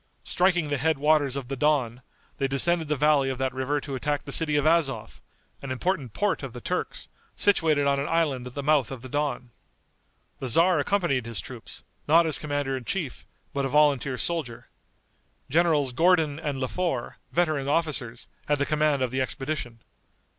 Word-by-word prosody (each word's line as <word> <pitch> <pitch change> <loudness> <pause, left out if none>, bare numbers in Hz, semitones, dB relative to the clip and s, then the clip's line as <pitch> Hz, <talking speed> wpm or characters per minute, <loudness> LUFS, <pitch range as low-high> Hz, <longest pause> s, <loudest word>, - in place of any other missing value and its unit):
Striking 175 -4 +1
the 145 - 0
head 160 +2 +1
waters 145 -2 +2
of 135 -3 -5
the 135 - -3
Don, 130 -4 +1 0.4
they 135 - +1
descended 160 +4 +1
the 150 - 0
valley 145 -1 +3
of 130 - -3
that 130 0 -1
river 130 +3 -1
to 140 - -7
attack 145 +2 -1
the 140 - -6
city 150 0 +1
of 145 - +2
Azov, 135 -9 +1 0.4
an 140 - -7
important 135 - -2
port 90 - 0
of - - -7
the - - -7
Turks, - - -3 0.3
situated 160 -8 +3
on 140 0 +2
an 140 - -2
island 150 -7 0
at 125 - -11
the 140 - -3
mouth 145 -4 +3
of 130 -3 -8
the 130 - -8
Don. 140 -4 -2 0.9
The 130 - -3
tzar 165 +6 +4
accompanied 145 - 0
his 115 -5 -5
troops, - - -9 0.2
not 165 +3 +6
as 160 - +1
commander 145 -2 -2
in 130 - -5
chief, 155 +1 -4 0.3
but 140 - -1
a 135 - -1
volunteer 140 -2 +3
soldier. 125 -9 -3 0.8
Generals 155 -5 +2
Gordon 160 -1 +3
and 145 -4 -3
Le 130 - -1
Fort, 165 -7 -3
veteran 155 -5 +1
officers, 140 -7 -1 0.2
had 145 - +2
the 140 - 0
command 150 -3 +1
of 125 - -1
the 130 0 -1
expedition. 130 -3 -4
145 Hz, 185 wpm, -26 LUFS, 130-155 Hz, 0.9 s, not